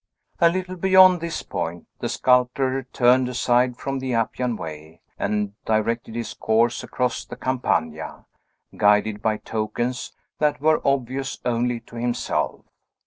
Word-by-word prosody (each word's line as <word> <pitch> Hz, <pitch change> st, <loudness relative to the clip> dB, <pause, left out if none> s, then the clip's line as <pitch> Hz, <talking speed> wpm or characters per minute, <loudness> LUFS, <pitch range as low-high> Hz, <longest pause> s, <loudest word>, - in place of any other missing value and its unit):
A 170 Hz, -2 st, +6 dB
little 185 Hz, +1 st, -3 dB
beyond 185 Hz, -1 st, +6 dB
this 170 Hz, 0 st, -4 dB
point, 85 Hz, +1 st, -4 dB
the -, -, -2 dB
sculptor 130 Hz, +1 st, +2 dB
turned 125 Hz, +1 st, +4 dB
aside 125 Hz, 0 st, +2 dB
from 135 Hz, +1 st, -3 dB
the 130 Hz, -2 st, -2 dB
Appian 120 Hz, +1 st, -1 dB
Way, 80 Hz, -3 st, -8 dB, 0.2 s
and 105 Hz, -1 st, -1 dB
directed 110 Hz, +1 st, -1 dB
his 120 Hz, 0 st, -4 dB
course 115 Hz, +2 st, +1 dB
across 125 Hz, 0 st, -2 dB
the -, -, -9 dB
Campagna, 80 Hz, -12 st, -2 dB, 0.5 s
guided 105 Hz, 0 st, +3 dB
by 110 Hz, -1 st, +1 dB
tokens 120 Hz, +4 st, -3 dB, 0.3 s
that 150 Hz, -3 st, +1 dB
were 155 Hz, +2 st, +3 dB
obvious 135 Hz, 0 st, -1 dB
only 120 Hz, 0 st, 0 dB
to 115 Hz, +1 st, -13 dB
himself. 120 Hz, 0 st, -2 dB
125 Hz, 135 wpm, -23 LUFS, 110-130 Hz, 0.5 s, A